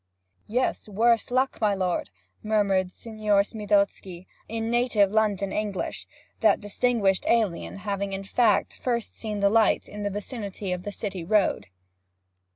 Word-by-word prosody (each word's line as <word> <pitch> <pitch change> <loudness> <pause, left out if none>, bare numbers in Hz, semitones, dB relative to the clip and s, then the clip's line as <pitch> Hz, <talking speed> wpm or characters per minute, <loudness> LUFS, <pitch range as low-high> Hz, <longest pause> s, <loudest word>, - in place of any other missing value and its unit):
'Yes, 245 -1 -1
worse 230 +3 +2
luck, 255 +1 0
my 210 -2 +3
lord!' 185 -2 -1 0.3
murmured 200 -4 +1
Signor 215 -2 0
Smithozzi, 200 -4 -1 0.2
in 225 +1 -2
native 235 -5 +3
London 205 -3 +1
English, 210 -3 -3 0.3
that - - +4
distinguished 205 -2 +1
alien 215 -8 +1
having, 200 0 -3
in 195 0 -4
fact, 210 +1 +1
first 235 -3 -2
seen 210 -2 -4
the 200 - +5
light 225 0 +3
in 210 - -8
the 205 - -1
vicinity 205 -2 -5
of 180 0 -2
the 205 - -5
City 195 -4 -4
Road. 205 +3 +1
205 Hz, 140 wpm, -26 LUFS, 195-225 Hz, 0.3 s, the